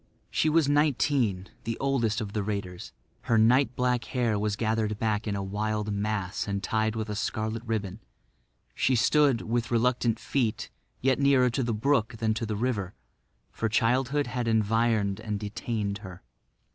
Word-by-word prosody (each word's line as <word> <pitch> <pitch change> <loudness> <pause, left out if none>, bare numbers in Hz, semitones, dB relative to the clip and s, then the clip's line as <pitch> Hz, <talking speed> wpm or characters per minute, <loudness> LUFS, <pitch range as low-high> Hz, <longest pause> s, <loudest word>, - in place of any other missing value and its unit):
She 155 - +2
was 155 -2 +3
nineteen, 140 -9 +1
the 115 0 -3
oldest 120 -5 0
of 105 -2 -5
the 105 - 0
raiders. 100 -3 -4 0.3
Her 115 - +3
night 125 +4 +4
black 125 -2 0
hair 115 -3 0
was 105 0 0
gathered 110 -1 -1
back 110 0 -1
in 100 - -1
a 100 - -2
wild 105 +1 -2
mass 100 -2 -2
and 100 -1 -2
tied 110 0 0
with 110 -1 -3
a 105 - -3
scarlet 110 +1 -2
ribbon. 105 -3 -2 0.7
She 130 - +2
stood, 135 +1 +3
with 120 +1 -1
reluctant 120 -1 +1
feet, 120 -3 -2 0.3
yet 130 +1 +2
nearer 135 -3 +4
the 120 0 -1
brook 115 0 +1
than 110 0 +1
to 115 +1 -3
the 105 - -2
river; 105 -4 -2 0.6
for 115 - -2
childhood 130 +6 +1
had 120 -1 -3
environed 110 -2 +1
and 105 -2 -3
detained 105 -1 -3
her. 95 -3 -10
110 Hz, 160 wpm, -27 LUFS, 105-125 Hz, 0.7 s, night